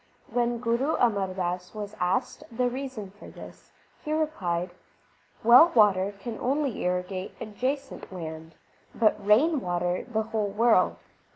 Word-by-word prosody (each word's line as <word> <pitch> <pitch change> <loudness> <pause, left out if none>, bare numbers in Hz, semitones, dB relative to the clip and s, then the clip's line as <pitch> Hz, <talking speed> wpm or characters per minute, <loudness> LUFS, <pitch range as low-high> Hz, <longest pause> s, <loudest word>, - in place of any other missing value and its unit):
When 240 -1 0
Guru 240 +6 0
Amar 200 -6 +1
Das 180 +1 -3
was 210 0 -6
asked 190 +9 -1
the 250 +2 0
reason 255 -7 -6
for 205 - -14
this, - - -13 0.3
he 305 - -4
replied: 185 - -1 0.7
Well 245 +9 +8
water 200 -2 +4
can 220 +2 -6
only 275 -1 -1
irrigate 180 +1 -3
adjacent 260 +6 -4
land, 160 -2 -8 0.4
but 215 -2 +2
rain 270 +10 +4
water 175 0 -1
the 220 -1 0
whole 215 -2 -2
world. 215 -2 +3
215 Hz, 130 wpm, -27 LUFS, 185-245 Hz, 0.7 s, Well